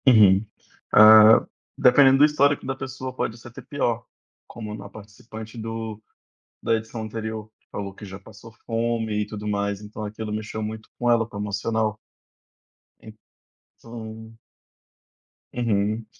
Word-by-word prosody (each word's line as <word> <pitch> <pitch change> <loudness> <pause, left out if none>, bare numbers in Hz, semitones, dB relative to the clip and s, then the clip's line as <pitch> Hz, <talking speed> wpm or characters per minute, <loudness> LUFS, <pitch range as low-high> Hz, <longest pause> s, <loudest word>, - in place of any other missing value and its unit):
Uhum. 105 -4 +6 0.5
Ah, 110 +1 +8 0.3
dependendo 135 +1 +6
do 145 - +7
histórico 145 -2 +2
da 135 0 -3
pessoa, 130 -1 -6
pode 120 -2 -3
ser 120 - -12
até 120 - -11
pior. 120 -5 -2 0.4
Como 105 -2 -8
na 100 -1 -9
participante 110 +2 -11
do 110 -1 -6 0.6
da - - +1
edição 110 0 -5
anterior, 110 0 -5
que - - -42
falou 100 -1 -5
que: 100 - -14
"Já, 95 0 -9
passou 110 +3 -14
fome 115 -2 -1
e - - -1
tudo 105 0 -7
mais". 100 -1 -2
Então, 105 +1 -8
aquilo 105 +1 -5
mexeu 110 0 -5
muito 110 +1 -6
com 120 - +1
ela, 115 -1 +3
com 110 - -10
o - - -5
emocional. 105 +1 -1 1.6
Então 110 -1 -11 1.2
Uhum. 110 -2 -1
110 Hz, 140 wpm, -24 LUFS, 105-115 Hz, 1.6 s, Ah